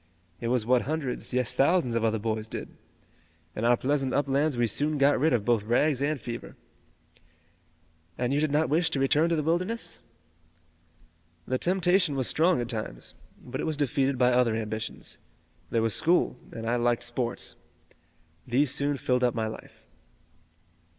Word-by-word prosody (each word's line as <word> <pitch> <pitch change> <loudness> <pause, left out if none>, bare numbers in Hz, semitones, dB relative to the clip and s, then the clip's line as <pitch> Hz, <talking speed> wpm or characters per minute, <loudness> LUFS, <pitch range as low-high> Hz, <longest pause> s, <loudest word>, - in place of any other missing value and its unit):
It 115 - -3
was 120 -2 +1
what 125 +1 +3
hundreds, 145 -4 -3
yes, 125 -1 +1
thousands 140 -4 +2
of 115 -1 0
other 110 0 +1
boys 110 0 -3
did. - - -6 0.9
In 105 - -3
our 120 +1 +4
pleasant 135 0 0
uplands 140 0 +1
we 120 - +3
soon 145 +7 0
got 140 0 +3
rid 155 +4 +3
of 115 -5 +1
both 120 -3 +2
rags 130 +5 +2
and 145 0 0
fever." 115 0 -7 1.6
"And 125 +2 -1
you 145 - +2
did 155 0 +1
not 150 +2 +2
wish 160 +3 +2
to 145 - -1
return 145 +5 +3
to 170 - +2
the 155 - -1
wilderness?" 180 +9 -2 1.4
"The 130 0 -1
temptation 180 -3 +2
was 130 -2 +1
strong 170 -1 +3
at 120 -1 -3
times, 110 - -5 0.3
but 130 +1 -4
it - - -2
was 155 -2 -2
defeated 140 -2 +1
by 125 0 +4
other 120 -3 +3
ambitions. 110 0 -4 0.5
There 115 -1 +1
was 115 -2 +1
school 170 - +2 0.2
and 115 0 -6
I 120 +1 +1
liked 120 0 +1
sports. 120 0 -1 0.9
These 130 +3 +2
soon 140 +1 0
filled 125 -1 0
up 120 -1 +2
my 110 -1 -1
life." 110 0 -9
130 Hz, 170 wpm, -27 LUFS, 120-150 Hz, 1.6 s, our